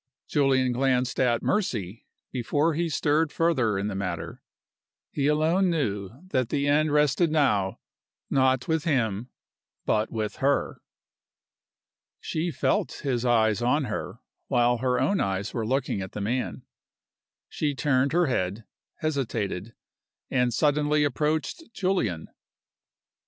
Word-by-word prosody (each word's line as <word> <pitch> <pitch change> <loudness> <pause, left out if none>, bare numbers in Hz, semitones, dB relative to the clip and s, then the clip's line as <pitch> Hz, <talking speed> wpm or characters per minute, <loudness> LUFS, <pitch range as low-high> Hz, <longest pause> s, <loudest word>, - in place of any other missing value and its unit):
Julian 135 -3 +2
glanced 130 0 +1
at 120 -2 +2
Mercy 115 - -2 0.2
before 145 +6 +1
he 170 +2 -1
stirred 150 +1 +1
further 130 -11 +1
in 100 - -2
the 105 - -3
matter. 85 -4 -4 0.7
He 140 -1 0
alone 160 +5 +3
knew 105 - -1 0.2
that 130 -7 0
the 140 +1 0
end 150 +1 +3
rested 150 +3 +3
now 105 -11 +2 0.5
not 130 -2 +2
with 160 -1 +1
him 120 - 0 0.6
but 110 +1 +1
with 110 -1 -3
her. 140 +1 0 1.4
She 160 +2 -2
felt 135 -5 -1
his 125 -4 0
eye 115 -3 +3
on 145 +5 +2
her 115 - -4 0.3
while 120 0 +2
her 125 0 +1
own 150 +10 +1
eyes 95 +1 -1
were 115 -2 -2
looking 130 -5 0
at 95 - -7
the 105 - -4
man. 120 +5 -2 0.8
She 145 -2 -2
turned 135 -1 +2
her 175 +2 +3
head 105 - -1 0.4
hesitated 115 - -2 0.6
and 125 -1 +2
suddenly 150 +3 +2
approached 155 - -1
Julian. 150 - -1
130 Hz, 125 wpm, -26 LUFS, 110-150 Hz, 1.4 s, alone